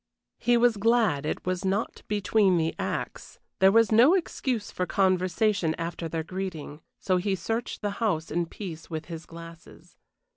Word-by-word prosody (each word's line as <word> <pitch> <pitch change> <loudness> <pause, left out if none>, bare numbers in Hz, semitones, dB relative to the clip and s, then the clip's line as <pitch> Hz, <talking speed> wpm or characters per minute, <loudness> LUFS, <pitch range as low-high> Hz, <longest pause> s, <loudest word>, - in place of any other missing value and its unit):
He 240 0 +3
was 235 -2 +3
glad 205 -9 +2
it - - -3
was 185 0 -2
not 195 +3 -1
between 205 -2 +2
the 160 0 0
acts - - -4 0.2
there 190 0 +6
was 230 +1 +4
no 245 - +6
excuse 255 - -2
for 180 - -2
conversation 185 -2 +1
after 165 0 -4
their 160 0 -3
greeting, 165 -4 -6 0.2
so 185 -1 +1
he 195 +2 0
searched 225 +7 -4
the 205 - 0
house 165 -8 0
in 170 +1 0
peace 165 -4 -8
with 160 -1 -5
his 165 -2 -8
glasses. 165 0 -13
185 Hz, 160 wpm, -27 LUFS, 165-215 Hz, 0.2 s, there